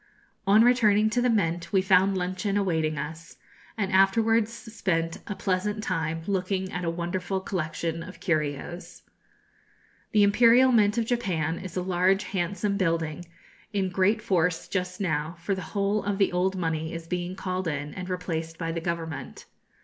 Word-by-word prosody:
On 210 +3 +7
returning 220 -3 +4
to 245 - +1
the 250 - +2
Mint 170 -6 0
we 195 - +4
found 190 0 +4
luncheon 185 +3 -1
awaiting 160 -6 0
us, 160 +3 -7 0.4
and 200 -3 -1
afterwards 220 +4 +3
spent 190 -8 -2
a 205 - -3
pleasant 205 +3 -1
time 165 -4 -2
looking 190 -1 -1
at 180 - -4
a 170 - 0
wonderful 175 +3 -2
collection 165 -2 -3
of 165 - -10
curios. 155 0 -3 1.1
The 210 -1 +5
Imperial 235 +5 +6
Mint 210 -2 +3
of 230 - +1
Japan 180 -10 -1
is 185 -1 -7
a 180 - 0
large 185 +2 +2
handsome 200 +2 -1
building, 165 -3 -1 0.5
in 195 -2 0
great 200 +4 +2
force 175 -4 +1
just 185 -1 -3
now, 160 -3 -1
for 170 +4 -1
the 190 - -3
whole 200 +4 -1
of 200 -1 -1
the 195 -1 +2
old 185 +2 +1
money 160 -2 -2
is 165 0 -6
being 180 +1 -3
called 185 -1 -3
in 145 -1 -3
and 185 0 -6
replaced 165 -3 -3
by 165 -1 -3
the 165 0 -3
government. 165 -3 -5
185 Hz, 165 wpm, -27 LUFS, 165-200 Hz, 1.1 s, On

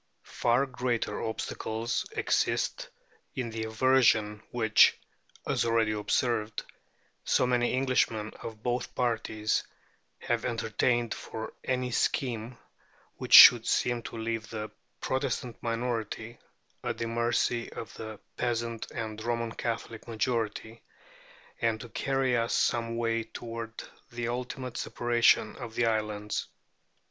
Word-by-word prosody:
Far 120 +3 +1
greater 125 -5 -2
obstacles 110 +1 -3
exist - - 0 0.5
in 125 -4 -3
the 110 0 -3
aversion 110 -3 +3
which 110 -3 +5 0.5
(as - - +1
already 115 -2 +2
observed) 105 +1 0 0.6
so - - +3
many 125 0 +1
Englishmen 125 -5 +1
of 110 -1 -8
both 120 0 -2
parties 110 -3 0 0.6
have 120 -2 -1
entertained 120 0 0
for 110 0 -7
any 125 -1 -1
scheme 120 -1 -1 0.6
which - - -4
should - - +11
seem 120 -1 +1
to 115 - -8
leave 115 -1 -3
the 105 -1 -5 0.3
Protestant 130 -3 -2
minority 115 -1 -3 0.4
at - - -2
the 115 - -2
mercy 120 +1 0
of 110 - -8
the 110 -2 -8 0.2
peasant 115 -2 -2
and 110 -2 -5
Roman 115 -1 -1
Catholic 115 -1 -4
majority, 115 0 -2 0.8
and 115 -1 +1
to 120 - -9
carry 135 -1 0
us 115 0 +1
some 115 -1 +1
way 115 -1 0
toward 115 -1 -7 0.3
the 120 0 -3
ultimate 125 0 -4
separation 120 -2 +2
of 120 -4 -8
the 120 - +2
islands. 105 -2 -1
115 Hz, 115 wpm, -29 LUFS, 110-120 Hz, 0.8 s, should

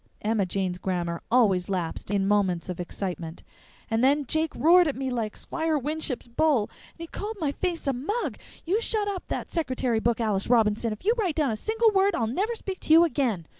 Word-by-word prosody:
(Emma 210 -3 +1
Jane's 180 -1 -2
grammar 175 -2 -2
always 200 -7 +3
lapsed 180 -3 -3
in 195 -1 +1
moments 190 -4 +1
of 180 - -4
excitement.) 175 -2 -5 0.4
And 225 +1 0
then 285 +2 +3
Jake 315 +4 0
roared 345 +2 +5
at 290 - -1
me 265 0 -3
like 225 -3 -3
Squire 320 -1 -1
Winship's 295 -1 -3
bull.... 245 -2 +1 0.2
And - - -32
he - - -4
called 415 +6 -6
my 300 -4 0
face 345 +2 -3
a 275 - +1
mug.... 370 - -2 0.3
You 390 +7 +1
shut 430 -3 -1
up 390 -3 -4
that - - -4
secretary 255 -8 0
book, 235 +1 0
Alice 210 -4 0
Robinson! 225 -1 +3
If 215 - -7
you 445 - +4
write 365 -8 0
down 295 -6 +1
a - - -1
single 445 - +2
word 390 -1 +3
I'll 230 - 0
never 395 - -1
speak 385 -4 -6
to 310 - +2
you 330 +1 +8
again.... 250 - 0
255 Hz, 210 wpm, -26 LUFS, 205-330 Hz, 0.4 s, you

